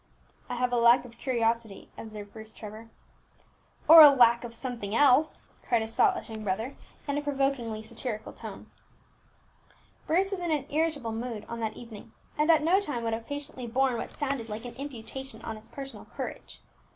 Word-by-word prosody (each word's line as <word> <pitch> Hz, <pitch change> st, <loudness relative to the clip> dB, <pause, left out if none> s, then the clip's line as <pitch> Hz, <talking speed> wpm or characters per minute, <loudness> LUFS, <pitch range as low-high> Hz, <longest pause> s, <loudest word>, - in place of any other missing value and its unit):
"I -, -, -2 dB
have 250 Hz, 0 st, 0 dB
a -, -, +3 dB
lack 235 Hz, +2 st, +5 dB
of 235 Hz, -1 st, -14 dB
curiosity," 230 Hz, -5 st, -1 dB
observed 210 Hz, -2 st, -9 dB
Bruce 220 Hz, 0 st, -8 dB
Trevor. 215 Hz, +1 st, -10 dB, 1.0 s
"Or 325 Hz, 0 st, +11 dB
a 300 Hz, -, +12 dB
lack 240 Hz, -3 st, +5 dB
of 240 Hz, -, -6 dB
something 230 Hz, -4 st, -4 dB
else," 290 Hz, +3 st, +4 dB, 0.2 s
cried 235 Hz, -2 st, +1 dB
his 220 Hz, 0 st, -7 dB
thoughtless 380 Hz, -4 st, +2 dB
young 220 Hz, -2 st, -7 dB
brother, 215 Hz, +7 st, -2 dB, 0.3 s
in 285 Hz, 0 st, 0 dB
a -, -, -4 dB
provokingly 270 Hz, -6 st, -1 dB
satirical 220 Hz, -1 st, -5 dB
tone. -, -, -9 dB, 1.4 s
Bruce 375 Hz, +5 st, +2 dB
was 390 Hz, -, -2 dB
in 350 Hz, -1 st, -3 dB
an 295 Hz, -4 st, 0 dB
irritable 300 Hz, -6 st, 0 dB
mood 225 Hz, -1 st, -5 dB
on 235 Hz, -, -6 dB
that 220 Hz, -1 st, -3 dB
evening, 230 Hz, -2 st, -11 dB, 0.2 s
and 300 Hz, +2 st, +1 dB
at 315 Hz, -2 st, +5 dB
no 355 Hz, +5 st, +4 dB
time 290 Hz, -12 st, -1 dB
would 225 Hz, -1 st, -1 dB
have 225 Hz, 0 st, -5 dB
patiently 285 Hz, -3 st, -6 dB
borne 260 Hz, +2 st, +1 dB
what 230 Hz, -, -4 dB
sounded 270 Hz, -5 st, -2 dB
like 215 Hz, +3 st, -6 dB
an 245 Hz, -, -7 dB
imputation 265 Hz, -2 st, -7 dB
on 225 Hz, -, -5 dB
his 215 Hz, +1 st, -12 dB
personal 270 Hz, +3 st, -9 dB
courage. -, -, -8 dB
240 Hz, 180 wpm, -28 LUFS, 225-285 Hz, 1.4 s, a